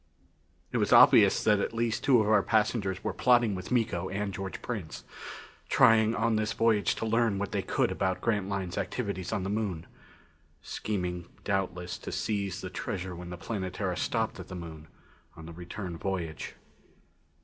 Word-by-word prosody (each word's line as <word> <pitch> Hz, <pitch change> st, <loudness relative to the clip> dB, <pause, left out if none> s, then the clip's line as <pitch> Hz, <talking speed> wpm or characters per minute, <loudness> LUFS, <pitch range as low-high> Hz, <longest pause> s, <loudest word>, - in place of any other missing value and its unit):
It -, -, 0 dB
was -, -, +1 dB
obvious -, -, +7 dB
that 105 Hz, -2 st, +4 dB
at 105 Hz, -, -2 dB
least 115 Hz, -1 st, -1 dB
two 125 Hz, -5 st, +5 dB
of 105 Hz, -, 0 dB
our 105 Hz, -1 st, +5 dB
passengers 105 Hz, -3 st, 0 dB
were -, -, -2 dB
plotting 120 Hz, -4 st, +3 dB
with 90 Hz, -1 st, -6 dB
Miko 110 Hz, -7 st, 0 dB
and 100 Hz, +1 st, -3 dB
George 95 Hz, 0 st, -5 dB
Prince; 105 Hz, -10 st, -5 dB, 0.7 s
trying 110 Hz, 0 st, +5 dB
on 115 Hz, 0 st, +1 dB
this 110 Hz, 0 st, 0 dB
voyage 115 Hz, -3 st, +2 dB
to -, -, -3 dB
learn 115 Hz, -2 st, +2 dB
what 100 Hz, 0 st, -3 dB
they -, -, 0 dB
could -, -, 0 dB
about 95 Hz, -1 st, -1 dB
Grantline's 100 Hz, -4 st, -1 dB
activities 100 Hz, -7 st, -3 dB
on 105 Hz, -4 st, -1 dB
the 95 Hz, -, -2 dB
Moon 100 Hz, -6 st, -2 dB, 0.7 s
scheming 90 Hz, -4 st, -4 dB, 0.2 s
doubtless 90 Hz, -3 st, -2 dB
to -, -, -7 dB
seize 100 Hz, -4 st, -2 dB
the -, -, -5 dB
treasure 90 Hz, -1 st, -4 dB
when 90 Hz, 0 st, -8 dB
the 90 Hz, -, -6 dB
Planetara 95 Hz, -2 st, -3 dB
stopped 115 Hz, 0 st, -1 dB
at 95 Hz, -, -8 dB
the 95 Hz, -, -7 dB
Moon 80 Hz, -3 st, -8 dB, 0.5 s
on 80 Hz, -, -10 dB
the 85 Hz, -, -9 dB
return 90 Hz, 0 st, -7 dB
voyage. 90 Hz, -5 st, -4 dB
100 Hz, 170 wpm, -29 LUFS, 90-110 Hz, 0.7 s, obvious